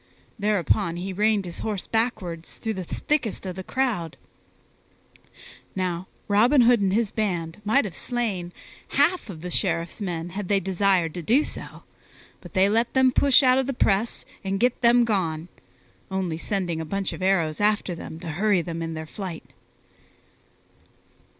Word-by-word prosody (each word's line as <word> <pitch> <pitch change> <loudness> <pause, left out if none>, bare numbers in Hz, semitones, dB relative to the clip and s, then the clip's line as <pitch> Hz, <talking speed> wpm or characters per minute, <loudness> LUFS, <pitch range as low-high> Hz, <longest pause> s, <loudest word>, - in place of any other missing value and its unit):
Thereupon 190 -5 +1
he 190 +2 -4
reined 210 0 +2
his 175 - -6
horse 210 -4 -3
backward 215 -8 -1
through 220 +5 -5
the 190 -2 -4
thickest 235 - -2
of 185 -1 -4
the 190 - -6
crowd. 215 - -1 1.6
Now 185 -1 -2 0.2
Robin 235 +7 +5
Hood 240 -2 +5
and 195 -1 +2
his 215 0 +1
band 175 -5 -2
might 220 +6 +3
have 185 -5 -6
slain 210 -8 -2 0.5
half 300 - +3
of 165 -5 -8
the 180 +1 -5
Sheriff's 170 +4 -1
men 175 -3 -3
had 195 +1 -5
they 200 0 +3
desired 190 -3 +1
to 175 - -5
do 245 - +3
so, - - -7 0.6
but - - -13
they 190 +1 +5
let 230 +5 +1
them 260 -1 +5
push 280 +1 +5
out 255 0 +5
of 265 - -1
the 275 - -1
press 210 +1 +1 0.2
and 195 0 -1
get 245 +2 +1
them 240 0 +5
gone, 175 -6 -1 0.6
only 185 -4 -2
sending 175 -4 -2
a - - -3
bunch 195 +4 -2
of - - -8
arrows 175 -4 +1
after 210 -3 +2
them 165 -1 -8
to - - -6
hurry 190 +2 +2
them 165 -1 -5
in 165 0 -4
their 160 0 -5
flight. 180 0 -7
195 Hz, 165 wpm, -25 LUFS, 175-225 Hz, 1.6 s, Robin